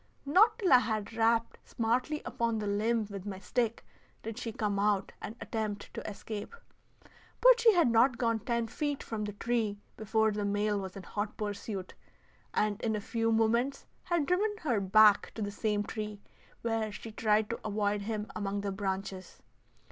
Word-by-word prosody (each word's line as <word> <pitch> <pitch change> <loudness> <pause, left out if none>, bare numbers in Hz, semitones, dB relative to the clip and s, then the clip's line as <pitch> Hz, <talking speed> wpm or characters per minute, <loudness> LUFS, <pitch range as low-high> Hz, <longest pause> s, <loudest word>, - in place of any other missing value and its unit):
Not 420 +10 +5
till 390 - +3
I 250 - +9
had 220 -2 -2
rapped 230 +1 +1
smartly 245 +6 -1
upon 230 -1 -1
the 215 - -3
limb 215 +2 +1
with 200 0 -6
my 195 -2 -4
stick 230 +3 -1 0.4
did 225 0 -5
she 230 - -4
come 205 -2 -1
out 205 -1 +1
and 220 - -6
attempt 215 -2 -4
to - - -5
escape; 210 - -7 0.8
but - - +7
she 460 -2 +6
had 345 -6 +4
not 240 +2 +4
gone 230 -2 +1
ten 235 +1 -1
feet 285 +5 -3
from 220 -2 -4
the 210 - -5
tree 220 -1 -1 0.2
before 220 0 +2
the 210 0 -2
male 205 0 +1
was 190 -1 -6
in 195 - -8
hot 205 +3 -4
pursuit, 205 -2 -4 0.6
and 210 -1 0
in 220 -1 0
a - - -1
few 225 +2 -1
moments 235 +4 +1 0.2
had 345 -4 +1
driven 410 +6 +1
her 245 -8 +1
back 205 +1 +5
to 225 - -5
the 205 - -3
same 205 0 0
tree, 210 -1 -5 0.4
where 225 -2 0
she 220 +2 -8
tried 215 0 +2
to 230 - -3
avoid 205 -1 0
him 210 0 -3
among 200 -1 -2
the 200 -1 -2
branches. 190 -1 -4
220 Hz, 180 wpm, -31 LUFS, 205-235 Hz, 0.8 s, I